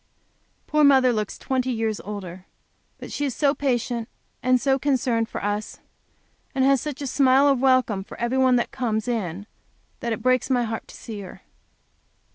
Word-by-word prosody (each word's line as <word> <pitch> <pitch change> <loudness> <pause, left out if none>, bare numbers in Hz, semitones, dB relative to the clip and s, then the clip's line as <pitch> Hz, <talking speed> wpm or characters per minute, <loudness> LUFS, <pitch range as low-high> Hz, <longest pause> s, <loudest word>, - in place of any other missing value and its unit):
Poor 300 0 +2
mother 265 -3 +5
looks 215 -2 -3
twenty 260 -1 -1
years 225 -2 -1
older, 190 -3 -8 0.5
but - - -9
she 290 - -3
is 270 -4 -1
so 280 -2 +2
patient, 245 -4 -1 0.3
and 255 0 +3
so 270 +1 +1
concerned 245 -5 0
for - - -6
us, 205 +1 -3 0.8
and 265 -1 +3
has 275 -1 +4
such 290 -2 -5
a - - -3
smile 270 +1 +4
of 275 -3 +3
welcome 255 -7 +2
for - - -12
every 240 +3 0
one 260 -1 +4
that 240 - 0
comes 230 -3 -2
in, 205 -5 -3 0.5
that 235 -3 -3
it 225 - -3
breaks 255 +1 +2
my 250 -2 +2
heart 225 -1 -4
to - - -13
see 220 -3 -8
her. 190 - -11
250 Hz, 180 wpm, -24 LUFS, 220-265 Hz, 0.8 s, mother